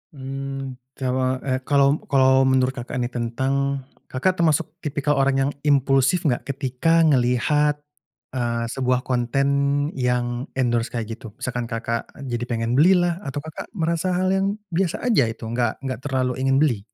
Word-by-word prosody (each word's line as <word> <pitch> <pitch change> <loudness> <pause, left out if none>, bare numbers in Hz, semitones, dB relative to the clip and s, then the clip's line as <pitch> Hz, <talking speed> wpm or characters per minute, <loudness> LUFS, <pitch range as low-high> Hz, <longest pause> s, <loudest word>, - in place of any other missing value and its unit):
Mmm, 135 -1 -6 0.2
kawa 130 0 -1
eh, 130 -1 0
kalau 140 +1 +4
kalau 130 -1 +4
menurut, 130 -1 +3
Kakak, 125 -2 -7
nih, 125 0 -1
tentang 135 +3 -1 0.2
Kakak, 180 +9 0
termasuk 160 -3 +2
tipikal 145 -2 -1
orang 135 0 +3
yang 140 - 0 0.2
impulsif 140 +4 +3
nggak, 125 -5 0
ketika 140 +4 +1
ngelihat, 145 +1 +3 0.6
eee, 120 -2 -1
sebuah 125 -1 0
konten 130 +2 0 0.5
yang 125 +1 -1
endorse 120 -2 +1
kayak 115 -1 -3
gitu? 115 -5 -11
Misalkan, 120 -1 -4
Kakak, 115 0 -3 0.2
jadi 120 -3 -3
pengen 115 -1 -1
belilah, 175 +1 +4
atau, 145 -6 -5
Kakak, 160 -1 -8
merasa 170 +1 0
hal 185 +1 +1
yang 195 +1 +1 0.2
biasa 175 0 -1
aja, 220 - +3
itu, 115 0 -7
nggak 120 +2 -2
nggak 130 -4 -3
terlalu 130 -2 -1
ingin 135 0 +2
beli? 125 -9 +1
130 Hz, 150 wpm, -23 LUFS, 125-145 Hz, 0.6 s, kalau